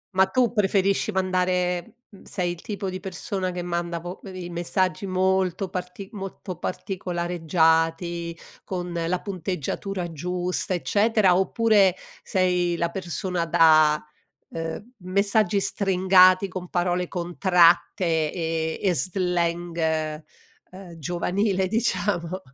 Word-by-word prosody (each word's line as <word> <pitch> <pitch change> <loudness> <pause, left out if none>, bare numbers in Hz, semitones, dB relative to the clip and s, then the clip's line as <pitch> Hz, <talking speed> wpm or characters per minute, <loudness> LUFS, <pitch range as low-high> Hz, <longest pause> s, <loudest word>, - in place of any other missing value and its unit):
Ma 190 0 +5
tu 240 +3 +1
preferisci 200 0 +2
mandare, 180 -2 0 0.2
uhm, 195 - -15
sei 180 -3 -2
il 175 - -8
tipo 200 -2 -5
di 185 - -5
persona 190 0 -4
che 175 0 -4
manda 170 -1 -2
vo 175 +2 -8
i 185 -2 -7
i - - -7
messaggi 185 +3 -1
molto 190 0 +1
parti 180 +1 -6
molto 195 -2 -7
particolareggiati, 170 -2 0 0.3
con 180 -2 -4
la 170 +2 -1
punteggiatura 185 -1 -4
giusta 180 +3 -2
eccetera, 205 0 +3
oppure 195 -1 +3 0.3
sei 180 -2 +1
la 170 0 0
persona 180 -1 -3
da 155 -2 +5 0.5
ehm, 165 +8 -5
messaggi 200 +3 +1
stringati 185 -1 +4
con 185 -1 -7
parole 180 0 0
contratte, 175 0 +3 0.3
ehm, 160 -2 -2
e 190 -3 +2
slang, 170 -2 -1 0.5
uhm, 185 -2 -11
giovanile 185 +4 0
diciamo? 195 -5 -1
180 Hz, 110 wpm, -24 LUFS, 170-190 Hz, 0.5 s, Ma